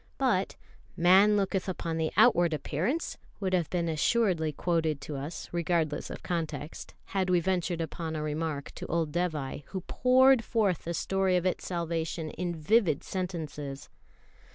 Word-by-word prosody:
But 240 -8 +1 0.4
"Man 195 +4 +6
looketh 195 -1 0
upon 165 -3 -3
the 160 -1 0
outward 170 -2 +5
appearance" 185 - -2 0.2
would 190 -2 -1
have 175 -4 +1
been 170 -2 -1
assuredly 165 0 +1
quoted 160 -1 0
to 150 - -6
us, 145 +5 -5
regardless 165 -3 0
of - - -8
context, 160 -4 -4 0.2
had 190 -2 +1
we 180 -1 +4
ventured 175 -1 -1
upon 160 0 -4
a 155 - -2
remark 150 -1 -3
to - - -7
old 165 -2 0
Dévai, 155 -5 -2
who 190 - -5
poured 255 +4 +4
forth 210 -8 0
the 170 +1 -2
story 190 0 +1
of 180 - -1
its 185 - -1
salvation 165 -2 -2
in 175 0 -3
vivid 165 -1 +2
sentences. 155 -7 -5
170 Hz, 155 wpm, -29 LUFS, 160-190 Hz, 0.4 s, Man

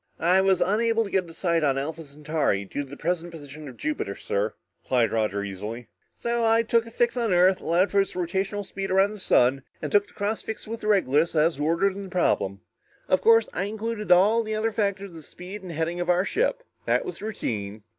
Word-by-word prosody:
"I 180 +3 +4
was 190 -1 +2
unable 225 +3 +2
to 200 - -8
get 185 -3 0
a - - -10
sight 170 -2 0
on 135 -2 +2
Alpha 160 +4 -4
Centauri 150 -8 -1
due 145 - -4
to 140 - -8
the 140 - -9
present 175 +1 -2
position 150 -2 -10
of 125 - -13
Jupiter, 110 -8 -3
sir," 100 +2 -2 0.3
replied 120 -4 +1
Roger 105 -3 0
easily. 105 +5 -6 0.3
"So 235 0 -1
I 225 0 +4
took 230 0 +1
a - - -8
fix 235 +1 0
on 235 -4 0
Earth, 180 +1 +4
allowed 175 +4 +2
for 200 - +4
its 195 - -4
rotational 190 +3 -2
speed 195 0 -5
around 195 +2 +3
the 215 - -9
sun 130 -6 +3 0.2
and - - -5
took 205 0 +3
the - - -22
cross 210 +2 -2
fix 220 - -6
with 230 0 -6
Regulus 170 -7 +2
as 155 -1 +2
ordered 170 +6 +1
in 200 - -7
the - - -10
problem. 100 - 0 0.5
Of 185 - +2
course, 230 -1 +5
I 195 - -1
included 215 -1 -4
all 205 +6 +5
the 215 -1 -3
other 220 +1 0
factors 200 -2 -1
of - - -14
the 160 - -9
speed 180 +6 -9
and 185 -2 -8
heading 165 +2 -2
of 175 0 -2
our 180 +2 +3
ship. - - 0 0.2
That - - +2
was 370 - -7
routine." 110 - -4
180 Hz, 225 wpm, -25 LUFS, 150-210 Hz, 0.5 s, course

